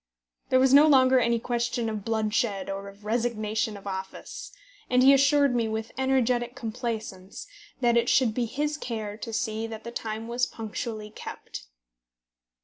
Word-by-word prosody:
There 255 Hz, -, +4 dB
was 265 Hz, 0 st, +4 dB
no 290 Hz, +2 st, +8 dB
longer 260 Hz, -3 st, +6 dB
any 235 Hz, -1 st, +2 dB
question 240 Hz, 0 st, -1 dB
of 215 Hz, -2 st, -4 dB
bloodshed 215 Hz, -3 st, -1 dB
or 195 Hz, 0 st, -5 dB
of 200 Hz, +1 st, -17 dB
resignation 220 Hz, -2 st, -1 dB
of 200 Hz, -, -14 dB
office, 190 Hz, -1 st, -6 dB, 0.4 s
and 250 Hz, 0 st, +4 dB
he 270 Hz, +1 st, +8 dB
assured 280 Hz, 0 st, +4 dB
me, 235 Hz, -2 st, +1 dB
with 220 Hz, 0 st, -4 dB
energetic 250 Hz, -2 st, +1 dB
complaisance, 220 Hz, -5 st, -5 dB, 0.4 s
that 240 Hz, -1 st, +3 dB
it 235 Hz, 0 st, +3 dB
should 245 Hz, -5 st, +3 dB
be 240 Hz, +1 st, 0 dB
his 295 Hz, +5 st, -2 dB
care 220 Hz, -6 st, -4 dB
to 225 Hz, +1 st, -6 dB
see 220 Hz, 0 st, -2 dB
that 220 Hz, -1 st, -8 dB
the 235 Hz, -, -7 dB
time 220 Hz, -1 st, -5 dB
was 240 Hz, +1 st, 0 dB
punctually 220 Hz, -1 st, -6 dB
kept. -, -, -9 dB
230 Hz, 160 wpm, -27 LUFS, 215-250 Hz, 0.4 s, no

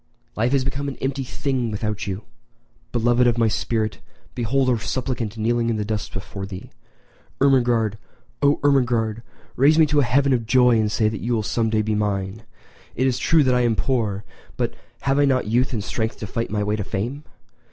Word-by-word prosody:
], 120 Hz, -, -41 dB
life 115 Hz, +3 st, +1 dB
has 135 Hz, -2 st, +2 dB
become 140 Hz, +1 st, -3 dB
an 140 Hz, -, -4 dB
empty 135 Hz, 0 st, -2 dB
thing 130 Hz, -2 st, -2 dB
without 105 Hz, -1 st, -3 dB
you. 100 Hz, +2 st, -4 dB, 0.7 s
Beloved 120 Hz, +1 st, +3 dB
of 120 Hz, -1 st, +2 dB
my 115 Hz, -1 st, +3 dB
spirit, 110 Hz, 0 st, -1 dB, 0.3 s
behold 130 Hz, +3 st, 0 dB
a 120 Hz, -, +1 dB
suppliant 120 Hz, -2 st, -3 dB
kneeling 115 Hz, +1 st, +1 dB
in 115 Hz, -, +1 dB
the 105 Hz, -1 st, -2 dB
dust 105 Hz, 0 st, -3 dB
before 95 Hz, 0 st, -6 dB
thee. 95 Hz, -2 st, -9 dB, 0.7 s
Ermengarde—oh, 120 Hz, +1 st, +1 dB
Ermengarde, 120 Hz, -6 st, +2 dB, 0.3 s
raise 145 Hz, +4 st, +4 dB
me 160 Hz, -, +7 dB
to 150 Hz, 0 st, +2 dB
an 140 Hz, -, +3 dB
heaven 135 Hz, +3 st, +3 dB
of 115 Hz, -3 st, -1 dB
joy 125 Hz, -1 st, +5 dB
and 105 Hz, -1 st, +1 dB
say 110 Hz, 0 st, +2 dB
that 110 Hz, -1 st, -3 dB
you 120 Hz, +2 st, -1 dB
will 110 Hz, -2 st, 0 dB
some 115 Hz, +1 st, 0 dB
day 110 Hz, -1 st, +1 dB
be 110 Hz, 0 st, -1 dB
mine! 100 Hz, 0 st, -2 dB, 0.5 s
It 130 Hz, -, +1 dB
is 130 Hz, -1 st, +1 dB
true 165 Hz, -3 st, +4 dB
that 130 Hz, -2 st, +3 dB
I 125 Hz, -, +3 dB
am 120 Hz, -2 st, +2 dB
poor, 110 Hz, -6 st, -1 dB, 0.3 s
but -, -, -1 dB, 0.3 s
have 135 Hz, +1 st, +1 dB
I 145 Hz, -, +5 dB
not 130 Hz, -2 st, +2 dB
youth 120 Hz, +4 st, +1 dB
and 110 Hz, -5 st, -2 dB
strength 110 Hz, +2 st, -3 dB
to -, -, -6 dB
fight 115 Hz, +3 st, -3 dB
my 105 Hz, 0 st, -1 dB
way 105 Hz, +1 st, 0 dB
to 105 Hz, -, -2 dB
fame? 115 Hz, +10 st, -4 dB
115 Hz, 205 wpm, -22 LUFS, 110-130 Hz, 0.7 s, me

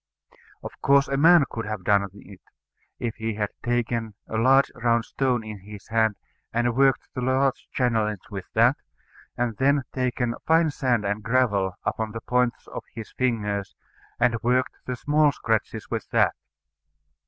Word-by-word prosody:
Of -, -, -6 dB
course 140 Hz, 0 st, +4 dB
a 135 Hz, -, -1 dB
man 165 Hz, +2 st, +6 dB
could 115 Hz, -1 st, -5 dB
have 110 Hz, -3 st, -4 dB
done 100 Hz, +1 st, +3 dB
it, 100 Hz, -1 st, -14 dB, 0.6 s
if 120 Hz, -2 st, -4 dB
he 110 Hz, -1 st, -3 dB
had 105 Hz, -1 st, -2 dB
taken 115 Hz, -2 st, -1 dB
a -, -, -5 dB
large 130 Hz, +5 st, +4 dB
round 115 Hz, -1 st, +1 dB
stone 125 Hz, -4 st, 0 dB
in 110 Hz, -2 st, -8 dB
his 105 Hz, +1 st, -12 dB
hand, 110 Hz, -1 st, +2 dB, 0.4 s
and 120 Hz, 0 st, 0 dB
worked 135 Hz, 0 st, +2 dB
the 130 Hz, -, -4 dB
large 130 Hz, +1 st, +1 dB
channellings 110 Hz, -5 st, 0 dB
with 95 Hz, -2 st, -5 dB
that, -, -, +4 dB, 0.6 s
and 120 Hz, -2 st, -1 dB
then 140 Hz, +2 st, +4 dB
had 140 Hz, -2 st, -2 dB
taken 125 Hz, -2 st, -1 dB
fine 160 Hz, -1 st, +4 dB
sand 125 Hz, -6 st, 0 dB
and 100 Hz, +2 st, -1 dB
gravel 105 Hz, -6 st, +1 dB
upon 110 Hz, -1 st, -2 dB
the 115 Hz, -, -5 dB
points 125 Hz, 0 st, 0 dB
of -, -, -6 dB
his 115 Hz, -2 st, -8 dB
fingers, 105 Hz, -6 st, -2 dB, 0.4 s
and 120 Hz, -2 st, +2 dB
worked 125 Hz, +2 st, +1 dB
the 125 Hz, -, -2 dB
small 150 Hz, +3 st, +3 dB
scratches 110 Hz, -5 st, -2 dB
with -, -, -3 dB
that. -, -, +3 dB
120 Hz, 165 wpm, -25 LUFS, 110-130 Hz, 0.6 s, man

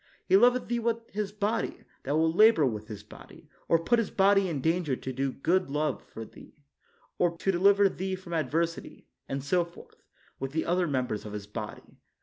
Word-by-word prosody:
He 190 Hz, -, +4 dB
loveth 245 Hz, +4 st, +4 dB
thee 240 Hz, 0 st, -1 dB
with 230 Hz, 0 st, -2 dB
his 205 Hz, -1 st, -3 dB
body, 210 Hz, +2 st, -2 dB, 0.2 s
that 140 Hz, -, -1 dB
will 160 Hz, +1 st, +2 dB
labor 215 Hz, -4 st, +6 dB
with 110 Hz, -4 st, -3 dB
his 105 Hz, -3 st, -8 dB
body, -, -, -15 dB, 0.2 s
or 165 Hz, -, +4 dB
put 235 Hz, +9 st, +2 dB
his 225 Hz, -, -1 dB
body 195 Hz, -1 st, +3 dB
in 155 Hz, -4 st, -2 dB
danger 160 Hz, -2 st, 0 dB
to 130 Hz, +1 st, -6 dB
do 135 Hz, +1 st, -1 dB
good 180 Hz, +8 st, +1 dB, 0.4 s
for 115 Hz, -, -8 dB
thee, -, -, -16 dB, 0.6 s
or 170 Hz, -1 st, +1 dB
to 195 Hz, -, +1 dB
deliver 200 Hz, +2 st, +5 dB
thee 190 Hz, 0 st, -3 dB
from 185 Hz, -2 st, -9 dB
adversity; 165 Hz, +2 st, -2 dB, 0.2 s
and 135 Hz, 0 st, -3 dB
so 175 Hz, +5 st, +2 dB
forth, 170 Hz, 0 st, -15 dB, 0.4 s
with 135 Hz, +1 st, -4 dB
the 160 Hz, -, -1 dB
other 175 Hz, +1 st, +1 dB
members 130 Hz, -6 st, -2 dB
of 105 Hz, -, -8 dB
his 105 Hz, -1 st, -5 dB
body. 105 Hz, +1 st, -8 dB
170 Hz, 190 wpm, -28 LUFS, 135-195 Hz, 0.6 s, labor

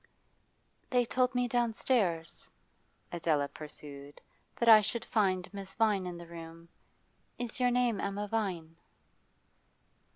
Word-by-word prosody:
'They 245 Hz, -1 st, +3 dB
told 255 Hz, +2 st, +1 dB
me 245 Hz, 0 st, +2 dB
downstairs,' 225 Hz, -8 st, 0 dB, 0.6 s
Adela 160 Hz, -4 st, +1 dB
pursued, 145 Hz, -1 st, -9 dB, 0.4 s
'that 235 Hz, -, -1 dB
I 220 Hz, -2 st, +10 dB
should 225 Hz, +2 st, -3 dB
find 185 Hz, -4 st, +1 dB
Miss 195 Hz, -1 st, -7 dB
Vine 210 Hz, -4 st, +2 dB
in 175 Hz, -1 st, -5 dB
the 170 Hz, -, -9 dB
room. 165 Hz, 0 st, -10 dB, 0.7 s
Is 245 Hz, 0 st, -3 dB
your 250 Hz, -1 st, +4 dB
name 245 Hz, -4 st, +1 dB
Emma 205 Hz, +1 st, -2 dB
Vine? 180 Hz, -7 st, -3 dB
200 Hz, 120 wpm, -31 LUFS, 165-235 Hz, 0.7 s, I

